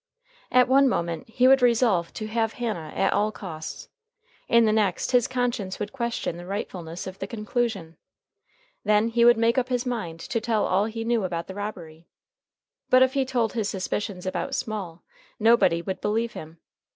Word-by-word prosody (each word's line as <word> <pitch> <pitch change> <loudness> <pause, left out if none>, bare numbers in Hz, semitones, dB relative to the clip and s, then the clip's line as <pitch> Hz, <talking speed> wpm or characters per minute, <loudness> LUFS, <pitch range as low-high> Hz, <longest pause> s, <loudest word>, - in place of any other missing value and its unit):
At 250 0 +5
one 270 +1 +5
moment 170 -4 -2
he 250 +3 +3
would 270 0 +6
resolve 230 -8 +3
to 215 - -4
have 225 0 -1
Hannah 210 -11 -4
at - - +2
all 210 +1 +1
costs. 160 -7 -8 0.6
In 235 -1 +5
the 215 - +3
next 210 -4 +1
his 245 -2 +4
conscience 245 -6 -2
would 205 0 -4
question 235 -9 -3
the 175 - -9
rightfulness 180 -3 -5
of 190 0 -8
the 195 - -4
conclusion. 215 -6 -3 0.9
Then 210 +2 +3
he 235 +1 +2
would 240 0 +7
make 230 +3 +3
up 250 - -3
his 250 0 -1
mind 210 -10 -4
to 230 - -2
tell 225 -2 +1
all 195 +3 +2
he 225 +1 -4
knew 230 -2 +1
about 170 -2 -3
the 190 - -8
robbery. 170 -6 -7 0.8
But 255 0 +7
if 260 0 +1
he 270 -2 +1
told 245 -4 0
his 220 -4 -1
suspicions 190 0 -3
about 185 - -2
Small, 190 -6 -5 0.4
nobody 225 -7 +4
would 190 0 -4
believe 225 +2 -1
him. 160 +1 -9
215 Hz, 180 wpm, -25 LUFS, 185-235 Hz, 0.9 s, would